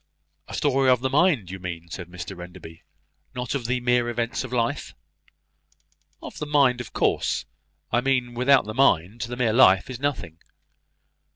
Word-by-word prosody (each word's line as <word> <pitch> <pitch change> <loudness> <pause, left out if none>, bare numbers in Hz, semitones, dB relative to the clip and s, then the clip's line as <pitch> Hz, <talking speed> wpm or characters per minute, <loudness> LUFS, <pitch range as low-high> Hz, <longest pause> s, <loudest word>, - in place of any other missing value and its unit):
"A - - -7
story 135 0 +2
of 125 -1 +4
the 130 0 -1
mind, 145 - +2
you 95 - -7
mean," 85 -2 -6
said 90 -1 -6
Mr 90 0 -8
Enderby, 85 -2 -12 0.5
"not 125 -2 -3
of 135 -4 -3
the 125 +1 0
mere 120 -1 +2
events 120 +2 -2
of 130 - -8
life?" 120 -2 -2 1.3
"Of - - -9
the 150 - -4
mind, 135 -4 +3
of 120 - -10
course, - - 0 0.5
I 120 - +2
mean. 125 -2 0
Without 130 +2 +3
the 110 - -5
mind 110 -4 +2
the 120 +1 -4
mere 120 -3 +1
life 105 -3 +5
is 125 - -7
nothing." 135 - -3
120 Hz, 170 wpm, -24 LUFS, 95-130 Hz, 1.3 s, life